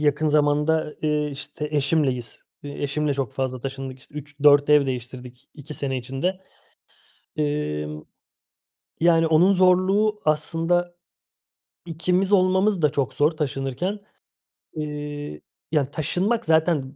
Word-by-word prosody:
yakın 150 +1 +1
zamanda, 150 +1 +1
eee, 150 -1 0
işte, 145 +2 -6
eşimleyiz. 140 -4 0 0.2
Eee, 145 0 -7
eşimle 145 0 -1
çok 135 -5 -3
fazla 130 -2 -3
taşındık. 135 0 -6
İşte, 140 - -20
3-4 145 0 +3
ev 150 -2 +5
değiştirdik 125 -1 -7
2 150 0 -9
sene 135 -2 -3
içinde. 135 +10 -3 1.0
Emm, 75 - -2 1.0
yani, 165 -1 +4
onun 170 +5 +4
zorluğu 190 +3 +3
aslında, 165 +3 0 0.9
ikimiz 180 +4 0
olmamız 190 0 +3
da 150 - +4
çok 140 -4 -1
zor 150 +1 +3
taşınırken. 150 +6 -3 0.7
Eee, 145 - -6 0.3
ya, 145 -3 +1
taşınmak 185 +10 -1
zaten 160 -4 +1
150 Hz, 115 wpm, -23 LUFS, 135-165 Hz, 1.0 s, ev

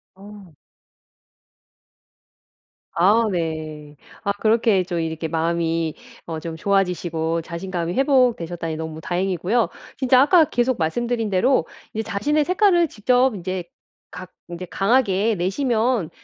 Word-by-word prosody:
어. 200 -3 -13 2.4
아 210 +6 +4
네. 155 -3 -4 0.3
아 200 - +1
그렇게 220 -3 +2
좀 175 -2 -3
이렇게 160 0 -3
마음이 165 0 -1 0.3
어 165 -2 -5
좀 160 +1 -6
좋아지시고 170 -3 0
자신감이 170 0 -4
회복되셨다니 225 - +1
너무 160 0 -6
다행이고요. 185 +6 0 0.3
진짜 260 -1 +4
아까 315 +3 +5
계속 245 -1 0
말씀드린 230 +7 -1
대로 240 +8 +2 0.3
이제 220 - -2
자신의 290 +9 0
색깔을 365 -2 +3
직접 250 +1 +2
인제 185 0 -4 0.5
각 185 0 -9 0.2
이제 175 +1 -6
강하게 210 -1 +2
내시면 220 - 0
190 Hz, 260 characters per minute, -22 LUFS, 170-240 Hz, 2.4 s, 아까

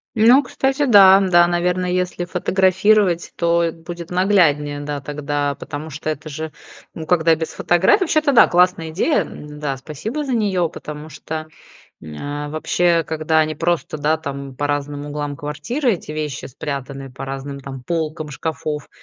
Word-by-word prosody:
Ну, 240 +6 +6
кстати, 270 +3 0
да. 195 -5 +8
Да, 175 -2 +5
наверно, 180 +1 0
если 180 -1 -1
фотографировать, 190 +1 +2
то 170 0 +2
будет 170 +1 -9
нагляднее, 160 -7 +2
да, 145 -1 -4
тогда, 145 0 -2
потому 155 +1 -7
что 155 +1 -8
это 155 +1 -7
же, 155 +2 -5 0.4
ну, 160 -1 -7
когда 165 -1 +4
без 160 0 -2
фотографи 175 - +3
вообще-то 310 -4 +2
да, 235 - +7
классная 175 -2 +2
идея, 245 - +2
м, 150 0 -9
да, 140 -3 -2
спасибо 185 - -5
за 265 - -2
нее. 195 -7 +1
Потому 150 +1 -8
что, 155 +2 -6 0.5
м, 145 - -6
вообще 170 +2 +1
когда 160 0 +1
они 155 -1 +1
просто, 170 -1 -1
да, 155 +2 +1
там, 140 -3 -6
по 145 +2 -1
разным 145 0 -3
углам 145 -1 -4
квартиры 205 - -1
эти 165 - -7
вещи 150 -2 -4
спрятаны, 135 0 -6
по 135 +1 -7
разным 135 +1 -6
там 135 -1 -8
полкам 155 0 -3
шкафов, 150 0 -4
160 Hz, 160 wpm, -20 LUFS, 145-180 Hz, 0.5 s, да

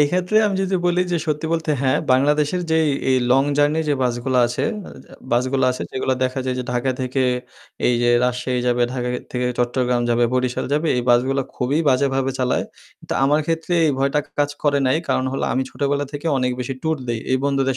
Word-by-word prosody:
এই 145 - +5
ক্ষেত্রে 180 +3 0
আমি 200 -2 -1
যদি 190 0 -1
বলি 175 0 +2
যে 175 - +2
সত্যি 150 +1 -1
বলতে 165 -2 -1
হ্যাঁ, 130 -1 +2
বাংলাদেশের 150 +6 +2
যেই 160 -1 +3 0.2
এই 130 - +4
লং 135 +2 +5 0.2
জার্নি 145 +2 +3
যে 145 - +3
বাসগুলো 125 +1 -1
আছে 120 - -3 0.7
বাসগুলো 130 +2 +1
আছে 125 - -4
যেগুলো 130 0 -1
দেখা 130 +1 -2
যায় 130 -1 -1
যে 125 - -3
ঢাকা 125 +2 0
থেকে 130 +1 -1 0.6
এই 125 - +3
যে 120 - +3 0.2
রাজশাহী 125 0 -1
যাবে, 120 0 +2
ঢাকা 125 -1 -2 0.2
থেকে 125 0 -1
চট্টগ্রাম 125 0 +1
যাবে, 120 0 +3
বরিশাল 125 -1 0
যাবে 150 +3 +1
এই 125 - 0
বাসগুলো 130 +3 +3
খুবই 130 +4 0
বাজেভাবে 135 0 +1
চালায়। 125 -1 0 0.4
তো - - -2
আমার 145 +3 +3
ক্ষেত্রে 165 +1 -1
এই - - +3
ভয়টা 140 +2 +1 0.2
কাজ 145 0 +2
করে 145 -1 +2
নাই 130 - +3
কারণ 130 - +1
হল 135 - -3
আমি 130 - +1
ছোটোবেলা 145 0 -1
থেকে 145 +2 -5
অনেক 125 -1 +1
বেশি - - -1
সেই - - -15
ট্যুর 160 0 0
দেই 115 -1 -1
এই 130 - +3
বন্ধুদের 135 -2 +1
135 Hz, 205 wpm, -21 LUFS, 125-150 Hz, 0.7 s, এই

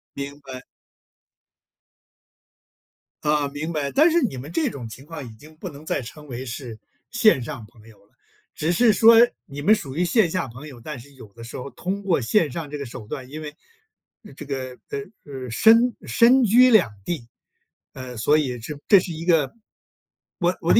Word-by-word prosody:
明 140 +1 -6
白。 130 -2 -9 2.6
啊， 150 -1 +1
明 150 +4 -5
白。 145 -2 -2
但 315 +4 +5
是 340 0 +3
你 170 - -1
们 140 +5 -8
这 165 -2 0
种 125 -5 -7
情 130 +5 -11
况 155 -4 -8
已 - - -9
经 155 +7 -16
不 185 - -6
能 150 +1 -13
再 145 - -1
称 150 +5 -11
为 130 0 -6
是 120 -2 -7 0.3
线 215 - +4
上 125 -4 -7
朋 110 0 -20
友 110 - -17
了。 - - -36 0.4
只 160 +3 -1
是 230 +5 +4
说 230 +4 +7 0.3
你 145 +1 -8
们 210 +8 +5
属 145 -11 -7
于 175 - +1
线 205 -1 +3
下 165 -5 -2
朋 130 +6 -10
友， 135 -5 -11
但 150 -1 -7
是 140 +4 -15
有 110 -6 -14
的 115 - -12
时 115 - -8
候 135 +2 -6
通 190 - -4
过 175 -8 +1
线 155 - +2
上 155 +1 -5
这 150 - -5
个 140 - -5
手 115 -3 -9
段， 130 +1 -7
因 155 +3 -7
为 150 -1 -8 0.8
这 150 - -9
个， 130 -2 -5
呃， 140 - -3 0.3
呃， 130 -3 -7
身 230 - +5
身 250 +2 +5
居 245 +4 +6
两 180 - +5
地。 140 -10 -4 0.7
呃， 130 -1 -8
所 145 +7 +3
以 125 -5 -1
这 145 +6 -7
这 200 -3 +8
是 180 - -5
一 160 +1 -6
个 165 -6 +2 0.9
我 - - +1
我 - - +1
的 - - +7
145 Hz, 210 characters per minute, -23 LUFS, 130-175 Hz, 2.6 s, 这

